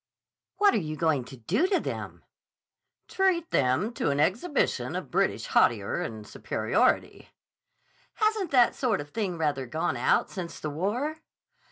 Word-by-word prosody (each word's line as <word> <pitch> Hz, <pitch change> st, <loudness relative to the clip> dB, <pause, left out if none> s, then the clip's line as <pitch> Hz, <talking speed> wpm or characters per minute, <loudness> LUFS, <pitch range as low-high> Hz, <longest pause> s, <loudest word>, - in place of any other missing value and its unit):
"What 410 Hz, -1 st, +5 dB
are -, -, +2 dB
you 155 Hz, -4 st, -4 dB
going 155 Hz, -5 st, +1 dB
to 130 Hz, -, -11 dB
do 125 Hz, -, +1 dB
to 380 Hz, -1 st, +2 dB
them?" -, -, -6 dB, 0.8 s
"Treat 370 Hz, -4 st, +1 dB
them 140 Hz, -, +1 dB
to -, -, -1 dB
an 140 Hz, 0 st, 0 dB
exhibition 235 Hz, -, 0 dB
of -, -, -5 dB
British -, -, +1 dB
hauteur 485 Hz, +1 st, +2 dB
and -, -, -6 dB
superiority." -, -, 0 dB, 0.9 s
"Hasn't 430 Hz, -3 st, +1 dB
that 250 Hz, -3 st, +4 dB
sort 235 Hz, -7 st, 0 dB
of 145 Hz, 0 st, -8 dB
thing 200 Hz, -6 st, -2 dB
rather 145 Hz, -5 st, -1 dB
gone 130 Hz, -1 st, -1 dB
out 120 Hz, -, +2 dB
since 180 Hz, -4 st, -6 dB
the 155 Hz, -, -4 dB
war?" 230 Hz, -, -2 dB
190 Hz, 150 wpm, -27 LUFS, -, 0.9 s, What